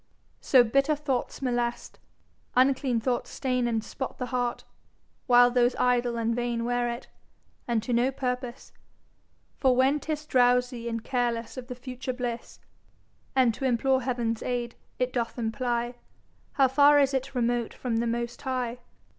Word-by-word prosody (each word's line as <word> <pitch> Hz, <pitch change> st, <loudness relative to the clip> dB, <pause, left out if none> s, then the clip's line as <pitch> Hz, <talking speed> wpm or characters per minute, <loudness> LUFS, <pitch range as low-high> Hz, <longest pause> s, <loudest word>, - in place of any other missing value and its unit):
So, 255 Hz, -3 st, +5 dB
bitter 275 Hz, +6 st, +2 dB
thoughts 280 Hz, -2 st, -3 dB
molest, 240 Hz, -2 st, -2 dB, 0.6 s
uncleane 260 Hz, -2 st, +3 dB
thoughts 245 Hz, +1 st, -1 dB
staine 250 Hz, -2 st, -1 dB
And 225 Hz, -2 st, -1 dB
spot 265 Hz, -, -6 dB
the 250 Hz, -, -3 dB
Heart; 245 Hz, -1 st, -1 dB, 0.6 s
while 245 Hz, -1 st, +6 dB
those 245 Hz, 0 st, +3 dB
idle 245 Hz, -1 st, +1 dB
and 230 Hz, 0 st, 0 dB
vaine 240 Hz, -1 st, -1 dB
Weare 245 Hz, 0 st, 0 dB
it, 235 Hz, +2 st, -6 dB, 0.6 s
and 230 Hz, -3 st, 0 dB
to 245 Hz, -, -2 dB
no 240 Hz, +2 st, +3 dB
purpose. 250 Hz, -1 st, -4 dB, 0.9 s
For 260 Hz, -2 st, +4 dB
when 265 Hz, +4 st, +3 dB
'tis 305 Hz, 0 st, -4 dB
Drowsie 245 Hz, -2 st, +2 dB
and 230 Hz, -1 st, -4 dB
carelesse 240 Hz, -3 st, -1 dB
of 255 Hz, -2 st, -7 dB
the 250 Hz, -, -6 dB
future 255 Hz, +1 st, -5 dB
blisse, 245 Hz, -2 st, -5 dB, 0.8 s
And 255 Hz, -3 st, +4 dB
to 250 Hz, -, -8 dB
implore 260 Hz, +1 st, +2 dB
Heav'n's 235 Hz, -3 st, -1 dB
aid, 240 Hz, -1 st, -2 dB, 0.2 s
it 250 Hz, 0 st, -1 dB
doth 235 Hz, -1 st, -2 dB
imply 240 Hz, +1 st, -1 dB, 0.6 s
How 270 Hz, -2 st, +4 dB
far 285 Hz, +2 st, +6 dB
is 275 Hz, -1 st, +3 dB
it 265 Hz, 0 st, -2 dB
remote 240 Hz, -1 st, 0 dB
from 240 Hz, -3 st, -3 dB
the 235 Hz, +1 st, 0 dB
most 235 Hz, +1 st, -3 dB
High. 250 Hz, -2 st, -2 dB
245 Hz, 155 wpm, -27 LUFS, 235-260 Hz, 0.9 s, while